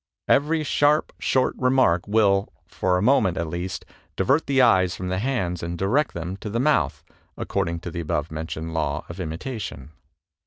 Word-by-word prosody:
Every 155 +2 +2
sharp, 145 +1 +2
short 130 -1 +1
remark 125 -10 +3
will, 100 -2 +2
for 90 +2 0
a 90 - -1
mo 135 +5 +5
ment, 95 -4 0
at 85 - -1
least, 85 +3 -5 0.3
divert 145 +5 +2
the 135 -1 +2
eyes 95 -8 +4
from 90 0 -5
the 95 0 -1
hands 100 -8 -1
and 85 +1 -4
direct 130 - +1
them 85 +3 -4
to 105 - -6
the 115 +3 -1
mouth, 150 +4 +1 0.3
according 85 0 -2
to 85 - -6
the 85 - -5
above 75 -2 -2
mentioned 80 +1 -5
law 80 -1 -2
of 85 +2 -8
imitation." 85 - -6
95 Hz, 180 wpm, -24 LUFS, 85-130 Hz, 0.3 s, mo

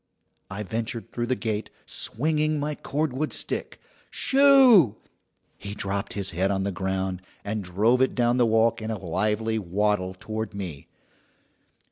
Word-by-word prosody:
I 100 +2 -5
ventured 115 +3 -4
through 120 0 -2
the 130 - +1
gate, 110 -3 -3 0.2
swinging 155 +3 -1
my 150 +1 -2
cordwood 150 0 -2
stick. - - -3 0.3
"Shoo!" 265 - +6 0.6
He 100 0 -7
dropped 100 -1 -3
his 100 -1 -1
head 90 +3 0
on 95 -1 0
the 100 - -1
ground, 95 0 -2 0.2
and 105 0 -2
drove 105 +8 +2
it 130 - +2
down 120 0 +2
the 120 -2 +4
walk 115 +1 +2
in 110 - -4
a 110 - -2
lively 105 +5 -1
waddle 95 0 0
toward 110 -1 -5
me. 90 -8 -6
110 Hz, 145 wpm, -25 LUFS, 95-125 Hz, 0.6 s, Shoo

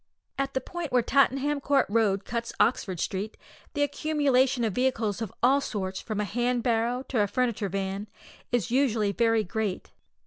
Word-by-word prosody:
At 275 0 -2
the 265 - +1
point 345 +3 -5
where 245 -1 +3
Tottenham 280 +2 +2
Court 275 -1 +3
Road 205 -2 +1
cuts 235 0 -3
Oxford 190 -7 +1
Street, 200 +5 -3 0.4
the 290 - +2
accumulation 280 -4 +2
of 220 -4 0
vehicles 235 -4 0
of 220 -4 -3
all 270 +3 +5
sorts, 190 -6 -3
from 215 -2 -4
a - - +1
hand 240 +3 0
barrow 240 +2 +1
to 240 -5 +1
a 205 - +2
furniture 235 -3 -1
van, 195 +2 -3 0.4
is 235 -5 0
usually 235 -6 +2
very 225 0 +2
great. 210 0 -3
235 Hz, 170 wpm, -27 LUFS, 210-265 Hz, 0.4 s, all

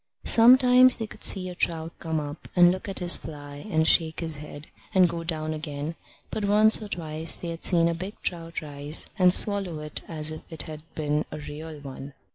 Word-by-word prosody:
Sometimes 250 +2 +6
they 225 - -4
could - - -11
see 185 -2 +2
a 180 - -6
trout 165 -2 -2
come 160 -1 -2
up 145 +1 -8
and 175 -1 +6
look 185 +2 -5
at 195 - -5
this 175 -1 +3
fly 145 +1 -10
and 160 -4 +1
shake 160 -2 +3
his 160 -2 -1
head, 150 0 -10 0.3
and 185 -1 +6
go 170 0 -5
down 155 -2 -3
again; 150 0 -5 0.4
but 215 - -3
once 215 +2 +5
or 215 - -7
twice 160 -4 -1
they 170 - -6
had 165 0 -7
seen 170 -2 +3
a 170 - 0
big 185 +5 -7
trout 165 -2 -4
rise 145 +1 -1
and 180 -1 +6
swallow 195 -4 +2
it 150 0 -8
just - - -5
as 155 -1 0
if 155 - -7
it 160 - -3
had 155 -1 -8
been 150 0 -1
a - - -6
real 150 +1 -8
one. 135 0 -9
165 Hz, 215 wpm, -25 LUFS, 150-185 Hz, 0.4 s, Sometimes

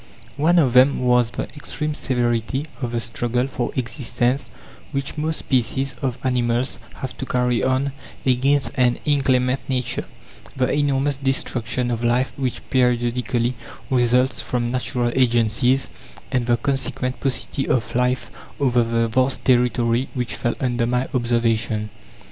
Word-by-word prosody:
One 165 +5 +3
of 135 -8 +4
them 130 +2 +6
was 125 -2 +3
the 120 - -4
extreme 150 +1 -3
severity 125 0 -1 0.2
of 120 -2 -2
the 120 - +1
struggle 120 +2 -1
for 130 -3 -3
existence 125 +1 -1 0.4
which 140 0 -3
most 155 +1 -1
species 130 +1 0
of 130 -2 -1
animals 125 0 0 0.2
have 130 - -6
to 135 - -3
carry 125 -1 +1
on 130 +2 +1 0.3
against 135 +2 +2
an 125 -2 +3
inclement 130 -3 +2
Nature; 125 -2 -1 0.5
the 130 -1 +1
enormous 145 -1 +1
destruction 125 -3 -1
of 120 0 -2
life 120 +2 +1
which 130 -3 -3
periodically 120 -1 +1 0.4
results 125 +1 +3
from 120 -1 -2
natural 125 -1 -1
agencies; 120 +1 +2 0.4
and 125 -3 0
the 120 -1 +3
consequent 135 0 -2
paucity 135 +1 -2
of 115 -5 0
life 125 +1 0 0.3
over 125 -4 +3
the 115 0 +1
vast 130 +4 +1
territory 125 -1 +2
which 125 -4 -2
fell 120 +3 -1
under 120 -2 0
my 125 +1 0
observation. 115 -3 0
125 Hz, 135 wpm, -22 LUFS, 120-135 Hz, 0.5 s, them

